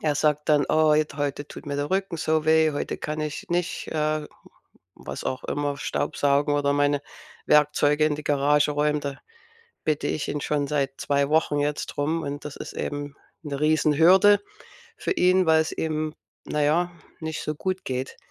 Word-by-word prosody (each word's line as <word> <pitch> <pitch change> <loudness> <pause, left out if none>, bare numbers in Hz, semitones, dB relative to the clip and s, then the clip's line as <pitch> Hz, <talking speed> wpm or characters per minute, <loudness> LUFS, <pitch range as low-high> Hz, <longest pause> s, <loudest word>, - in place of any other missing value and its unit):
er 150 -2 +1
sagt 150 0 +1
dann: 145 -2 +4
„Oh, 155 -1 +4
jetzt 150 -1 0
heute 145 0 -2
tut - - -10
mir 145 - -3
der 145 +3 -2
Rücken 190 -3 -1
so 155 0 +1
weh, 160 -1 +4
heute 145 - -3
kann 155 0 -4
ich 150 0 -4
nicht, 175 0 -2
äh, 155 -1 -1 0.7
was - - -7
auch 130 - -3
immer, 145 -1 -2
staubsaugen 145 0 0
oder 140 -1 +2
meine 145 0 +2 0.4
Werkzeuge 150 0 +4
in 150 -1 0
die 150 - -8
Garage 145 +1 +2
räumen.“ 150 0 +1
Da 140 -1 -5 0.7
bitte 150 -1 0
ich 155 - -2
ihn 145 - -3
schon 145 -1 0
seit 140 -2 -1
2 140 0 +1
Wochen 155 -2 +2
jetzt 145 0 -1
drum 155 +3 -2
und 145 0 -5
das 145 - -6
ist - - -8
eben 145 -1 -4 0.3
'ne 140 -2 -4
Riesenhürde 165 +7 +5 0.6
für - - -1
ihn, 185 - +3
weil's 160 0 +3
ihm, 155 -1 -2 0.3
na 150 0 -1
ja, 175 +4 +2 0.3
nicht 160 0 -4
so 150 - -3
gut 185 +4 -3
geht. 130 +1 -4
150 Hz, 175 wpm, -25 LUFS, 145-155 Hz, 0.7 s, Riesenhürde